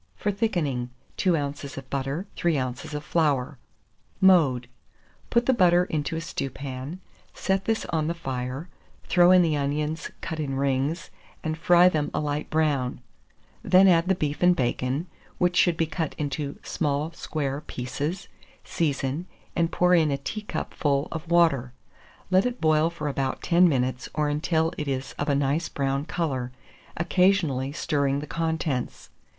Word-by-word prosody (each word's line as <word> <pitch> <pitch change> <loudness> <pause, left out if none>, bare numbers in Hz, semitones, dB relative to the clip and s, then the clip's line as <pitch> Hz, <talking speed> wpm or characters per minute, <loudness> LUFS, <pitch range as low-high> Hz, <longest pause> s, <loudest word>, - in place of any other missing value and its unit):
For 210 - -1
thickening, 165 - -1 0.3
2 180 -4 +2
oz. 140 -1 -5
of 135 -1 -7
butter, 140 +6 -2
3 170 -3 +1
oz. 130 +4 -4
of 150 - -4
flour. 140 -6 0 0.6
Mode. 150 -11 +4 0.6
Put 235 0 +2
the 260 - +4
butter 180 -5 +5
into 155 -2 -2
a 160 - -2
stewpan; 135 0 -5 0.4
set 190 0 0
this 225 0 0
on 155 -2 0
the 170 - -1
fire, 130 0 -4 0.4
throw 175 -1 +5
in 185 -1 +7
the 160 -3 +1
onions 150 +2 -2
cut 160 - -5
in 140 -3 -2
rings, 135 +4 -1 0.3
and 155 -2 -1
fry 175 +2 +5
them 155 -5 +1
a - - +1
light 150 0 -2
brown; 145 -5 0 0.6
then 190 +2 +6
add 170 -1 +4
the 190 - +3
beef 150 -4 -2
and 180 0 +5
bacon, 130 +3 -1 0.3
which 180 0 +1
should 175 -2 +4
be 165 - +2
cut 160 0 -3
into 145 -1 -3
small 150 0 -1
square 145 -4 -3
pieces; 145 +9 -4 0.4
season, 145 +1 -1 0.3
and 170 0 +1
pour 180 0 +3
in 160 -3 +4
a 140 - 0
teacupful 145 -5 -2
of 165 0 -6
water; 160 -8 +3 0.6
let 185 +5 +4
it 250 0 -5
boil 155 0 +3
for 170 -3 -5
about 135 -2 -2
ten 175 +1 +5
minutes, 130 -3 -1
or 150 -1 +1
until 160 +2 0
it 150 - -3
is 135 -1 -3
of 145 - -1
a 140 - +3
nice 140 +4 0
brown 140 0 -1
colour, 135 -8 -2 0.5
occasionally 170 -6 +2
stirring 140 -3 0
the 150 - -5
contents. 160 -5 -2
150 Hz, 155 wpm, -26 LUFS, 140-170 Hz, 0.6 s, in